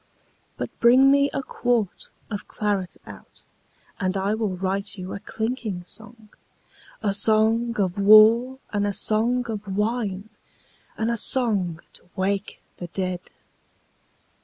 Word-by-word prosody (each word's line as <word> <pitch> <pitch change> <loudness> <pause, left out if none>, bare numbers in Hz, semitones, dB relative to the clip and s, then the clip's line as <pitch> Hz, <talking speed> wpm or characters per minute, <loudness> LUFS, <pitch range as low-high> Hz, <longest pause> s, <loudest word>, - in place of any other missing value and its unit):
But - - -5
bring 255 +3 +6
me 280 0 +3
a 275 - -3
quart 240 -7 -2 0.2
of 205 - -5
claret 200 -4 -3
out, - - -12 0.6
And 185 0 -1
I 195 +2 0
will 215 -4 -2
write 195 +2 -2
you 185 0 -7
a - - -6
clinking 220 -4 -4
song, 220 +2 -11 0.7
A 200 -2 +1
song 220 +3 +3
of 190 0 -1
war 220 +5 +6 0.2
and 205 0 0
a 205 - -2
song 235 +5 +1
of 215 -2 -6
wine 210 -2 -2 0.7
And 225 +1 0
a 235 - -1
song 205 -9 +2
to - - -16
wake 195 +1 -2
the 175 - -7
dead. 185 0 -4
210 Hz, 135 wpm, -23 LUFS, 195-230 Hz, 0.7 s, bring